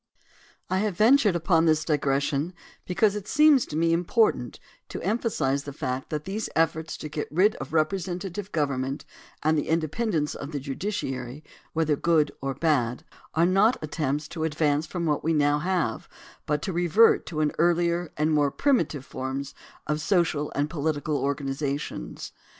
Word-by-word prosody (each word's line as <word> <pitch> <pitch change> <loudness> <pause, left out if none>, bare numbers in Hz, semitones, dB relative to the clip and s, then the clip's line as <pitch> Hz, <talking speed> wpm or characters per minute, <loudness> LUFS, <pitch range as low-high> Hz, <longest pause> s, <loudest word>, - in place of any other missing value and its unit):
I 185 - 0
have 205 -3 -1
ventured 220 -3 +5
upon 165 0 +3
this 155 -1 +2
digression 145 +2 0 0.3
because 195 +3 +2
it 210 -1 -5
seems 300 -1 +5
to - - -6
me 165 +1 +2
important 175 - +1 0.3
to - - -5
emphasize 165 - 0
the 145 - -6
fact 130 0 -4
that 150 -1 -3
these 205 +3 -3
efforts 160 0 0
to - - -6
get 150 0 -4
rid 190 +7 +3
of 135 - -7
representative 180 +4 -2
gov 150 -3 +1
ernment 135 +1 -3 0.4
and 155 +1 +3
the 150 - -1
independence 160 0 0
of 145 +2 -7
the 145 - -2
judiciary, 135 - -4 0.3
whether 155 -2 +2
good 155 -1 +2
or 135 0 -2
bad, 130 -6 0 0.3
are 165 +2 +4
not 195 +7 +4
attempts 150 -1 -2
to 160 -2 -4
advance 155 -1 +1
from 170 0 -3
what 150 -2 0
we 165 - +1
now 145 -1 +3
have 175 -8 -1 0.4
but 150 0 0
to 190 - -2
revert 175 +6 +4
to 155 - -4 0.2
earlier 170 0 +2
and 155 +1 +1
more 145 -2 +3
primitive 160 - 0
forms 135 +1 -5 0.3
of 150 +1 -1
social 160 -4 +1
and 145 +1 +1
political 150 -1 -2
organizations. 140 - -3
155 Hz, 160 wpm, -26 LUFS, 145-180 Hz, 0.4 s, ventured